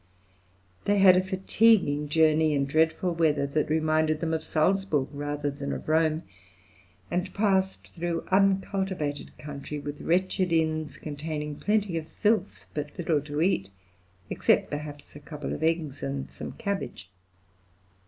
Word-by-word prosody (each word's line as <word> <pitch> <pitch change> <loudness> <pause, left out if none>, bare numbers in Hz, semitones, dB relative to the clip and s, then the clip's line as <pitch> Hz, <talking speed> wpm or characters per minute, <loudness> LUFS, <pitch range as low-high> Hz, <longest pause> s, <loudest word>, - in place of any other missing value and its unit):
They 205 0 +3
had 190 -2 +8
a 185 - +4
fatiguing 190 -5 +3
journey, 155 0 +4
in 140 -1 +1
dreadful 160 +4 +1
weather, 155 -4 +2
that 150 +2 -1
reminded 155 0 +2
them 160 -1 -1
of 160 -1 -1
Salzburg 160 -4 +1
rather 145 0 -2
than 140 0 -5
of - - -5
Rome, 160 +1 +2 0.9
and 180 +1 -1
passed 190 -2 0
through 170 -1 -3
uncultivated 190 -5 0
country 150 0 -6
with 145 0 -6
wretched 185 +1 +1
inns 155 -2 0
containing 150 0 -5
plenty 210 -4 0
of 155 - -10
filth 210 0 0
but 150 -1 -5
little 160 -4 +1
to 150 +2 -2
eat, 100 - +1 0.6
except - - +2
perhaps 145 -1 -6
a - - -8
couple 150 -1 -6
of - - -5
eggs 160 -3 0
and 135 0 -4
some - - -7
cabbage. 200 - -4
160 Hz, 140 wpm, -27 LUFS, 145-185 Hz, 0.9 s, had